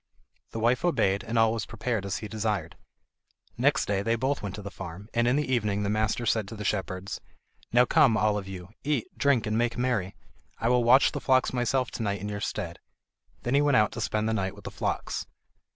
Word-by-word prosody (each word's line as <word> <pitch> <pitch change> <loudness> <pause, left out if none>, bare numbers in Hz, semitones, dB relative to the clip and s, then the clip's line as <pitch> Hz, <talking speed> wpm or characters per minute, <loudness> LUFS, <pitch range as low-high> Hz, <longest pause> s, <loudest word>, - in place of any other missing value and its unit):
The 115 - -5
wife 120 +5 +2
obeyed, 110 - +2
and 115 0 -3
all 115 0 +4
was 115 -1 -3
prepared 115 -3 -2
as 95 - -2
he 110 - -6
desired. 105 -6 -2 0.8
Next 140 +5 +2
day 100 -1 0
they 115 +3 +1
both 130 +5 -1
went 100 -2 -4
to 105 - -8
the 100 - -6
farm, 95 +2 -8
and 120 0 +2
in 125 - +3
the 145 -3 0
evening 105 -4 +1
the 100 - 0
master 110 +2 0
said 110 -2 +1
to 110 - -7
the 105 -1 -6
shepherds: 95 -1 -2 0.5
"Now 120 +1 +5
come, 135 -6 +4
all 105 -1 +2
of 100 -2 -4
you, 90 -2 -8
eat, 145 -5 0
drink, 140 -5 +2
and 110 +1 0
make 120 +1 0
merry. 120 -7 0 0.4
I 115 - 0
will 125 -1 +3
watch 130 +4 +6
the - - -4
flocks 130 -1 +3
myself 125 +1 0
to - - -5
night 100 -2 -1
in 105 +3 -5
your 100 -1 -4
stead." 90 -4 -4 0.6
Then 120 - -1
he 140 - +5
went 145 -3 +4
out 105 - +3
to 120 - -5
spend 110 0 0
the 110 - +1
night 95 -2 -1
with 100 - -14
the - - -6
flocks. - - -3
110 Hz, 230 wpm, -27 LUFS, 100-125 Hz, 0.8 s, watch